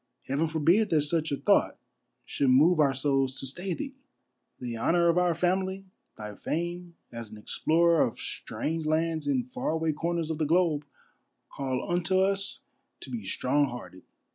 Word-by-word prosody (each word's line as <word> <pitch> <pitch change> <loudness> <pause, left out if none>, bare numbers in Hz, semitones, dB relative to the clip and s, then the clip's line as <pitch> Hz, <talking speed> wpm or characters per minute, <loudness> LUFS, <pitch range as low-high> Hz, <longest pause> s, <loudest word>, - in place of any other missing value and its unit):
Heaven 145 +5 0
forbid 165 +7 +3
that 160 -4 +3
such 160 +1 0
a 140 - 0
thought - - +2 0.5
should 140 - 0
move 155 +7 +5
our 145 -3 +5
souls 135 -1 0
to - - -5
stay 175 +7 -2
thee! 275 -2 -6 0.7
The 120 -2 -4
honor 170 +8 +2
of 170 +1 +3
our 175 -2 +2
family, 190 +2 0 0.3
thy 105 -1 -7
fame 175 - -4 0.2
as 115 -2 -7
an 110 - -11
explorer 165 +9 +2
of 115 - 0
strange 160 0 -4
lands 160 0 0
in 265 -3 +1
far 255 +1 -4
away 160 0 0
corners 165 +1 -2
of 160 - -4
the 155 - +1
globe, 160 -3 +2 0.7
call 130 -2 -3
unto 175 +1 +1
us 195 +1 +1 0.4
to - - -8
be 235 -2 -4
strong 140 +2 +1
hearted. 120 -6 -9
160 Hz, 165 wpm, -28 LUFS, 140-175 Hz, 0.7 s, move